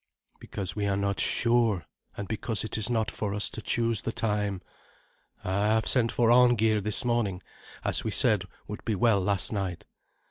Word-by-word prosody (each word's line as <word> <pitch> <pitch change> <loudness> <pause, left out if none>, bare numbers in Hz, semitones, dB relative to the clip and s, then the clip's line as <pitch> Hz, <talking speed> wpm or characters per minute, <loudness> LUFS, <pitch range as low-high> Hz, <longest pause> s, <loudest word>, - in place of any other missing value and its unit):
"Because 95 -3 -5
we 105 -1 -1
are 100 -1 0
not 100 0 -1
sure, 115 -6 +2 0.3
and 100 - -5
because 110 +1 -2
it 110 - -4
is 110 +1 0
not 110 -4 0
for 105 -2 -3
us 105 - +2
to 110 - -7
choose 115 -2 +1
the - - -3
time. 105 -4 -2 0.8
I 100 +3 0
have 110 0 +2
sent 120 -3 +2
for 120 -1 +2
Arngeir 115 -3 +4
this 105 +5 -1
morning, 110 -6 -1 0.4
as - - 0
we - - -2
said - - +2 0.2
would - - -7
be 110 - -1
well 100 0 +3
last 100 0 0
night. 95 -5 -3
105 Hz, 180 wpm, -27 LUFS, 100-115 Hz, 0.8 s, Arngeir